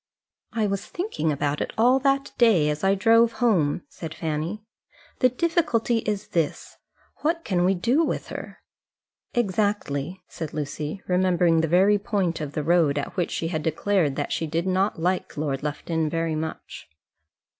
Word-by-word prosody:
"I 225 Hz, -2 st, 0 dB
was 200 Hz, -1 st, -1 dB
thinking 355 Hz, -, -2 dB
about 145 Hz, 0 st, -1 dB
it -, -, -3 dB
all 250 Hz, +4 st, +5 dB
that 275 Hz, 0 st, +1 dB
day 190 Hz, -11 st, +5 dB
as 150 Hz, 0 st, -5 dB
I 195 Hz, +1 st, +4 dB
drove 230 Hz, +3 st, +4 dB
home," 180 Hz, -, +1 dB
said 160 Hz, -2 st, -8 dB
Fanny. 160 Hz, +6 st, -3 dB, 0.6 s
"The 255 Hz, -, +5 dB
difficulty 255 Hz, -5 st, +1 dB
is 210 Hz, -2 st, -3 dB
this: 165 Hz, -4 st, -2 dB, 0.4 s
What 330 Hz, +2 st, -1 dB
can 180 Hz, -3 st, +1 dB
we 190 Hz, +1 st, +3 dB
do 240 Hz, -, +2 dB
with -, -, -2 dB
her?" -, -, -8 dB, 0.7 s
"Exactly," 190 Hz, -, -1 dB
said 160 Hz, -3 st, -7 dB
Lucy, 150 Hz, +4 st, -4 dB
remembering 180 Hz, -2 st, +3 dB
the 160 Hz, -, 0 dB
very 195 Hz, +5 st, +4 dB
point 195 Hz, -5 st, -1 dB
of 145 Hz, -2 st, -5 dB
the 150 Hz, -, -2 dB
road 160 Hz, -3 st, +3 dB
at 145 Hz, -, -4 dB
which 175 Hz, -, 0 dB
she 165 Hz, -, -2 dB
had 155 Hz, -3 st, -2 dB
declared 160 Hz, -1 st, +1 dB
that 145 Hz, -, -3 dB
she 160 Hz, -, -1 dB
did 165 Hz, +3 st, -1 dB
like 185 Hz, -2 st, 0 dB
Lord 145 Hz, -3 st, -2 dB
Lufton 155 Hz, +2 st, -2 dB
very 165 Hz, 0 st, -1 dB
much. 155 Hz, -, -6 dB
180 Hz, 160 wpm, -25 LUFS, 155-215 Hz, 0.7 s, all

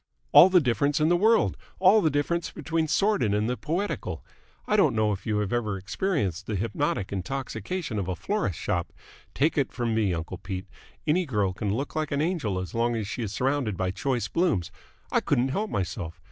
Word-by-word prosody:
"All 185 Hz, -, +9 dB
the 185 Hz, -1 st, +6 dB
difference 140 Hz, +1 st, +1 dB
in 155 Hz, +1 st, +3 dB
the 175 Hz, -, +4 dB
world, 220 Hz, +5 st, +3 dB, 0.2 s
all 195 Hz, +4 st, +6 dB
the 160 Hz, -, +3 dB
difference 155 Hz, +4 st, 0 dB
between 160 Hz, +1 st, -1 dB
the 155 Hz, -, -5 dB
sordid 195 Hz, -, +2 dB
and 105 Hz, +1 st, +1 dB
the 125 Hz, -, 0 dB
poetical. 170 Hz, +9 st, -3 dB, 0.4 s
I 210 Hz, -, +1 dB
don't 155 Hz, -, +4 dB
know 110 Hz, -1 st, +2 dB
if 100 Hz, +1 st, -5 dB
you 105 Hz, -1 st, +1 dB
have 105 Hz, 0 st, -1 dB
ever 110 Hz, -4 st, -1 dB
experienced 100 Hz, -, -2 dB
the 110 Hz, -, -2 dB
hypnotic 100 Hz, -1 st, -1 dB
intoxication 130 Hz, -, -3 dB
of 95 Hz, -, -3 dB
a 95 Hz, -, -2 dB
florist's 115 Hz, -, -2 dB
shop? -, -, -2 dB, 0.4 s
Take 150 Hz, +2 st, +2 dB
it 140 Hz, -, 0 dB
from 120 Hz, -2 st, -1 dB
me, 110 Hz, -4 st, +2 dB
uncle 85 Hz, +2 st, -4 dB
Pete, 95 Hz, 0 st, -5 dB, 0.4 s
any 165 Hz, +3 st, +2 dB
girl 105 Hz, -7 st, 0 dB
can 100 Hz, +1 st, -2 dB
look 135 Hz, +9 st, -3 dB
an 155 Hz, -2 st, -1 dB
angel 150 Hz, -, 0 dB
as 95 Hz, -1 st, -5 dB
long 120 Hz, +1 st, +1 dB
as 110 Hz, -3 st, -2 dB
she 120 Hz, -, -4 dB
is 110 Hz, -4 st, -3 dB
surrounded 130 Hz, -3 st, 0 dB
by 95 Hz, 0 st, 0 dB
choice 125 Hz, +4 st, -1 dB
blooms. 160 Hz, -, 0 dB, 0.4 s
I -, -, +4 dB
couldn't 125 Hz, +2 st, +1 dB
help 210 Hz, +10 st, -1 dB
myself. 85 Hz, -2 st, -3 dB
120 Hz, 200 wpm, -27 LUFS, 100-160 Hz, 0.4 s, All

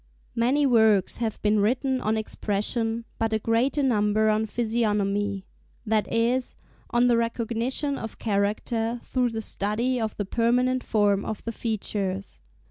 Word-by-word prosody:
Many 260 Hz, +5 st, +2 dB
works 220 Hz, -6 st, +4 dB
have 225 Hz, -2 st, -2 dB
been 210 Hz, 0 st, +3 dB
written 255 Hz, +5 st, +1 dB
on 220 Hz, +1 st, 0 dB
Expression, 225 Hz, +2 st, -1 dB
but 225 Hz, -1 st, 0 dB
a -, -, +3 dB
greater 235 Hz, +6 st, +1 dB
number 215 Hz, -3 st, +2 dB
on 215 Hz, +1 st, +1 dB
Physiognomy,—that 210 Hz, -1 st, -2 dB
is, 240 Hz, +3 st, +1 dB, 0.3 s
on 240 Hz, +1 st, +3 dB
the 240 Hz, -1 st, +4 dB
recognition 235 Hz, +4 st, -1 dB
of 225 Hz, -, -7 dB
character 225 Hz, +3 st, -1 dB
through 250 Hz, -2 st, 0 dB
the 225 Hz, -1 st, -4 dB
study 230 Hz, +6 st, 0 dB
of 220 Hz, -1 st, -3 dB
the 205 Hz, -, -2 dB
permanent 250 Hz, +4 st, +1 dB
form 205 Hz, -2 st, +2 dB
of 220 Hz, -2 st, -5 dB
the 230 Hz, -, -3 dB
features. 200 Hz, -4 st, -3 dB
225 Hz, 135 wpm, -25 LUFS, 210-240 Hz, 0.3 s, works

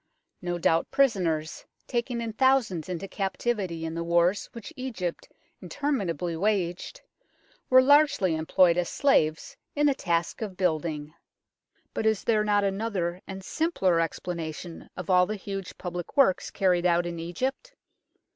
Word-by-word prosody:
No 175 Hz, -1 st, -2 dB
doubt 165 Hz, -1 st, +2 dB
prisoners, 175 Hz, -, +1 dB, 0.2 s
taken 240 Hz, 0 st, -2 dB
in 225 Hz, -1 st, -4 dB
thousands 230 Hz, -, +2 dB
into 180 Hz, +2 st, -4 dB
captivity 190 Hz, -3 st, -2 dB
in 160 Hz, -, -4 dB
the 170 Hz, 0 st, -3 dB
wars 170 Hz, +3 st, +2 dB
which 230 Hz, -3 st, -9 dB
Egypt 225 Hz, -10 st, -5 dB, 0.3 s
interminably 180 Hz, -, -2 dB
waged, 180 Hz, -1 st, -1 dB, 0.7 s
were 255 Hz, 0 st, +7 dB
largely 285 Hz, -, +4 dB
employed 170 Hz, +2 st, +3 dB
as 175 Hz, -, -1 dB
slaves 215 Hz, -, +1 dB, 0.2 s
in 295 Hz, 0 st, +2 dB
the 285 Hz, -, +4 dB
task 170 Hz, -6 st, -1 dB
of 200 Hz, -4 st, -5 dB
building; 155 Hz, -4 st, -1 dB, 0.8 s
but 220 Hz, -, 0 dB
is 220 Hz, -2 st, +1 dB
there 215 Hz, -2 st, +2 dB
not 205 Hz, -1 st, +2 dB
another 195 Hz, -3 st, -2 dB
and 190 Hz, -1 st, -7 dB
simpler 195 Hz, -, +1 dB
explanation 165 Hz, 0 st, -4 dB
of 180 Hz, 0 st, -3 dB
all 180 Hz, 0 st, +5 dB
the 215 Hz, -, -2 dB
huge 195 Hz, -1 st, -6 dB
public 175 Hz, -, -6 dB
works 265 Hz, -10 st, +4 dB
carried 180 Hz, -3 st, +2 dB
out 175 Hz, 0 st, +2 dB
in 170 Hz, -1 st, -4 dB
Egypt 260 Hz, -, -4 dB
185 Hz, 140 wpm, -27 LUFS, 170-225 Hz, 0.8 s, were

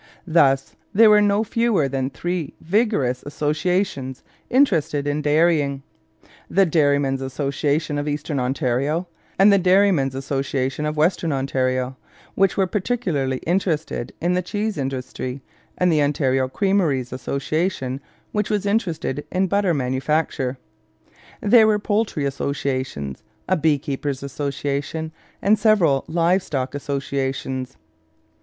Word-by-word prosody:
Thus 140 Hz, -5 st, +3 dB, 0.2 s
there 220 Hz, +1 st, +7 dB
were 210 Hz, 0 st, +6 dB
no 205 Hz, +1 st, +3 dB
fewer 225 Hz, -8 st, +1 dB
than 135 Hz, -1 st, -2 dB
three 170 Hz, +3 st, -4 dB
vigorous 170 Hz, -, +1 dB
associations 150 Hz, -2 st, -1 dB, 0.3 s
interested 165 Hz, -, +2 dB
in 145 Hz, +1 st, -1 dB
dairying: 150 Hz, -2 st, +2 dB, 0.7 s
the 195 Hz, +1 st, +4 dB
Dairymen's 145 Hz, -4 st, +2 dB
Association 145 Hz, +3 st, -1 dB
of 145 Hz, -, -3 dB
Eastern 145 Hz, -1 st, -2 dB
Ontario, 135 Hz, +6 st, 0 dB, 0.3 s
and 200 Hz, +2 st, +6 dB
the 200 Hz, -, +5 dB
Dairymen's 180 Hz, -7 st, +3 dB
Association 135 Hz, +1 st, -2 dB
of 150 Hz, 0 st, -3 dB
Western 165 Hz, +1 st, +1 dB
Ontario, 130 Hz, -1 st, -1 dB, 0.4 s
which 195 Hz, -1 st, +2 dB
were 195 Hz, -, +3 dB
particularly 180 Hz, -, -1 dB
interested 165 Hz, -8 st, -1 dB
in 175 Hz, +2 st, +1 dB
the 180 Hz, -, +1 dB
cheese 210 Hz, +4 st, -2 dB
industry, 130 Hz, -1 st, -4 dB, 0.4 s
and 180 Hz, -1 st, +3 dB
the 155 Hz, -2 st, +3 dB
Ontario 135 Hz, -2 st, +1 dB
Creameries 150 Hz, -6 st, 0 dB
Association, 140 Hz, 0 st, -2 dB, 0.3 s
which 210 Hz, -1 st, -1 dB
was 210 Hz, -1 st, 0 dB
interested 170 Hz, -, -1 dB
in 185 Hz, +1 st, +1 dB
butter 195 Hz, -2 st, +1 dB
manufacture. 135 Hz, 0 st, -1 dB, 0.8 s
There 220 Hz, +1 st, +6 dB
were 215 Hz, -1 st, +3 dB
poultry 210 Hz, -7 st, -1 dB
associations, 130 Hz, -, -3 dB, 0.3 s
a 185 Hz, -, +3 dB
beekeepers' 145 Hz, -3 st, -1 dB
association, 140 Hz, +3 st, -3 dB, 0.3 s
and 210 Hz, +2 st, +4 dB
several 190 Hz, -11 st, +3 dB
live 170 Hz, +3 st, +2 dB
stock 135 Hz, -7 st, -3 dB
associations. 135 Hz, -2 st, -3 dB
150 Hz, 120 wpm, -22 LUFS, 135-185 Hz, 0.8 s, there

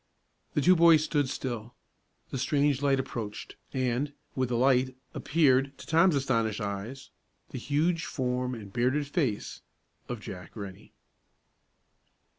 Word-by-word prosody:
The 145 Hz, -, +3 dB
two 185 Hz, +6 st, +6 dB
boys 165 Hz, -2 st, +6 dB
stood 145 Hz, -4 st, 0 dB
still; 120 Hz, -3 st, -5 dB, 0.6 s
the 135 Hz, -, -3 dB
strange 140 Hz, +1 st, +2 dB
light 140 Hz, -1 st, +3 dB
approached, 115 Hz, -5 st, -5 dB, 0.2 s
and, 130 Hz, +2 st, -1 dB, 0.2 s
with 130 Hz, -2 st, -1 dB
the 120 Hz, -, 0 dB
light, 130 Hz, 0 st, +3 dB, 0.2 s
appeared, 135 Hz, -3 st, +2 dB
to -, -, -11 dB
Tom's 165 Hz, +1 st, +4 dB
astonished 115 Hz, -6 st, 0 dB
eyes, 105 Hz, +6 st, -5 dB, 0.4 s
the 130 Hz, -, -5 dB
huge 160 Hz, +6 st, 0 dB
form 125 Hz, -3 st, -2 dB
and 100 Hz, -4 st, -10 dB
bearded 130 Hz, +5 st, +1 dB
face 140 Hz, -, -2 dB, 0.5 s
of 120 Hz, -2 st, -4 dB
Jack 90 Hz, -4 st, -9 dB
Rennie. 100 Hz, -4 st, -9 dB
130 Hz, 130 wpm, -29 LUFS, 120-145 Hz, 0.6 s, two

